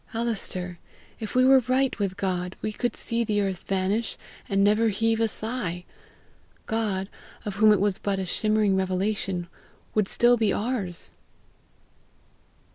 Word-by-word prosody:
Alister, 190 -6 -2 0.4
if 220 +1 -5
we 255 0 +5
were 265 0 +7
right 260 0 +1
with 195 -2 -1
God, 180 -2 -2
we 215 - -1
could 240 +1 -2
see 235 0 -1
the 210 -2 0
earth 195 -3 -1
vanish 195 +4 0 0.3
and 195 0 +3
never 210 +3 +4
heave 225 +2 +1
a 225 - +4
sigh; 215 -6 -3 0.8
God, 210 -4 -1 0.4
of 200 -2 -4
whom 215 0 +6
it 210 - +4
was 200 -1 +1
but 200 -1 -1
a 190 - -2
shimmering 215 +1 +2
revelation, 190 -1 -1 0.5
would 210 -3 +2
still 240 +3 +4
be 220 -3 +2
ours!" 205 -7 -2
205 Hz, 145 wpm, -26 LUFS, 190-225 Hz, 0.8 s, were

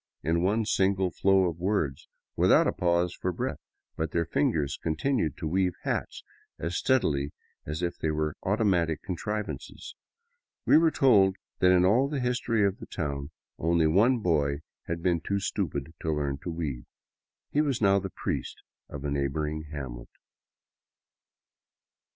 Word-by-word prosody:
in 80 +3 +1
one 105 +5 +1
single 95 -2 +2
flow 95 +3 +3
of 85 -1 -4
words, 90 -8 -1 0.3
without - - +5
a - - +2
pause 85 0 +1
for 90 - -2
breath, - - -3 0.4
but 80 0 -2
their 85 +2 0
fingers 75 -3 0
continued 80 - 0
to 85 - -5
weave 90 +2 +1
hats - - -3 0.3
as 85 +3 -3
steadily 75 - +1 0.4
as 80 +3 -3
if 85 - -2
they 80 - 0
were 75 0 -1
automatic 95 -6 +1
contrivances. 105 +3 -5 0.7
We - - +5
were 165 0 +4
told 105 -11 +4 0.2
that 90 - +5
in 90 0 +5
all 120 +8 +4
the 145 -2 -2
history 120 -4 +1
of 100 -1 -1
the - - -9
town 70 -4 -4 0.3
only 85 0 +2
one 110 +10 +4
boy 75 -5 +1 0.3
had 85 0 -3
been 85 -3 +2
too 100 +3 -1
stupid 80 -7 -3
to 80 - -1
learn 70 -2 -1
to 85 - -6
weave. 75 -7 -4 0.6
He 150 - +3
was 140 -5 0
now 100 -2 +4
the 95 0 -5
priest - - -4 0.3
of 75 0 -7
a 70 - -1
neighboring 75 +2 -2
hamlet. 65 -5 -7
85 Hz, 155 wpm, -28 LUFS, 75-100 Hz, 0.7 s, without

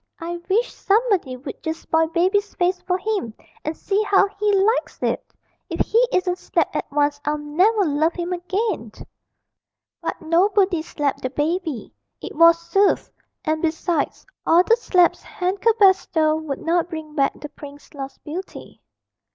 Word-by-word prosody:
I 340 0 -5
wish 450 +6 +1
somebody 400 - +1
would 265 +1 -9
just 320 0 -4
spoil 320 0 +2
Baby's 375 +5 +1
face 360 0 0
for 365 0 +2
him, 385 - -3 0.3
and 310 +1 -4
see 405 +1 0
how 405 -1 +4
he 420 0 +2
likes 405 +4 +1
it.... - - -2 0.4
If - - -2
he 465 +3 +3
isn't 365 0 0
slapped - - -1
at - - -3
once 290 0 +1
I'll 300 +1 0
never 370 +9 +2
love 310 +2 +1
him 350 0 -3
again!' 360 - -2 1.1
But - - -4
nobody 370 +2 +2
slapped 295 -3 -2
the 255 - -2
baby 310 - -2 0.3
it - - -8
was 335 +1 +7
soothed; 360 +4 +1 0.3
and, 310 0 0
besides, 325 -1 -1 0.2
all 340 +2 +5
the 460 - +4
slaps 365 -7 +2
hand 370 +2 -3
could 455 0 +3
bestow 370 -6 +4
would 315 -3 -4
not 340 +1 +1
bring 315 -3 -7
back 275 -2 0
the 295 - -7
prince's 290 +1 -13
lost 275 -1 -8
beauty. 345 +5 -8
345 Hz, 160 wpm, -22 LUFS, 310-390 Hz, 1.1 s, was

